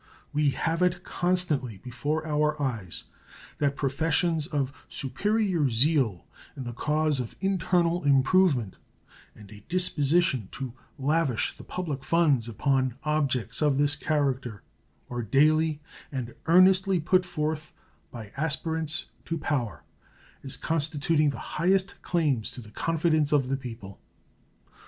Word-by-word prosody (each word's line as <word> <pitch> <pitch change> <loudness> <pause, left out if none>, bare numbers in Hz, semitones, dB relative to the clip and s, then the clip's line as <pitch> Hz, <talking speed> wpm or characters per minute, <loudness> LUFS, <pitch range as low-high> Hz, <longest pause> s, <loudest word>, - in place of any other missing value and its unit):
We 150 0 +3
have 165 +5 -1
it 180 0 +1
constantly 165 - -1
before 130 +8 -3
our 150 0 0
eyes 115 - -2 0.6
that 140 -1 +1
professions 160 +3 +1
of 140 -4 -2 0.2
superior 180 - 0
zeal 125 - +1 0.3
in 135 - -5
the 120 -1 -5
cause 150 +2 +1
of 120 -3 -5
internal 180 -3 +1
improvement 140 - +3 0.6
and 105 -1 -14
a 105 -1 -13
disposition 165 - +2
to 130 -3 -5 0.2
lavish 140 -3 0
the - - -11
public 150 -7 -4
funds 145 -7 +2
upon 130 +2 0
objects 135 -6 0
of 145 -3 +3
this 145 0 +3
character 135 -7 -1 0.4
are 120 -1 -4
daily 155 +6 +3 0.3
and 125 -4 -4
earnestly 185 +2 +5
put 180 +3 +3
forth 155 -3 -3 0.4
by 110 -4 -9
aspirants 155 +1 -1 0.2
to 165 - -2
power 125 - -2 0.6
as 135 - -2
constituting 155 -1 +1
the 140 - -4 0.2
highest 190 +2 +1
claims 150 -10 0
to 125 - -7
the 105 -2 -12
confidence 155 +1 +1
of 140 -4 +2
the 135 - +1
people. 115 -7 -9
150 Hz, 125 wpm, -27 LUFS, 130-165 Hz, 0.6 s, earnestly